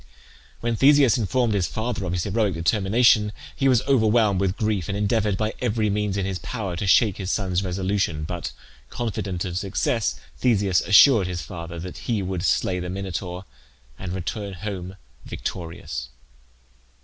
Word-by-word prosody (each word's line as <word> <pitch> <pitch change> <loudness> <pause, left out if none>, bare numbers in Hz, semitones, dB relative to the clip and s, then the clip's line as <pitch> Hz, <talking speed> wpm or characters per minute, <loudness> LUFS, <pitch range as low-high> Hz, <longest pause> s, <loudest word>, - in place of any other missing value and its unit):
When 115 0 0
Theseus 140 0 +5
informed 120 0 +1
his 95 -4 +1
father 110 -2 -3
of 90 - -2
his 90 -2 -1
heroic 105 -1 0
determination, 105 +5 +3 0.2
he 135 - +1
was 125 -3 +3
overwhelmed 110 -6 +3
with 95 0 0
grief, 105 -6 -1
and 100 - -1
endeavoured, 105 -1 +1
by 110 0 -1
every 110 -3 +1
means 105 -1 -1
in 95 - -1
his 95 -1 -3
power, 100 -7 -4
to 100 - -2
shake 105 0 +4
his 95 -2 -4
son's 95 -2 0
resolution, 95 -4 -1
but, 85 +2 -4 0.4
confident 100 -6 -3
of 90 -1 -2
success, 105 +3 -1 0.2
Theseus 100 -7 +2
assured 105 +1 +6
his 90 -3 -4
father 85 +2 -7
that 90 +1 -7
he 110 -4 +1
would 90 -2 -3
slay 90 +1 +1
the 90 0 -4
Minotaur 95 -1 -5 0.5
and 90 -2 -5
return 100 +2 -4
home 95 -1 -6 0.3
victorious. 80 -8 -6
100 Hz, 160 wpm, -24 LUFS, 90-110 Hz, 0.5 s, assured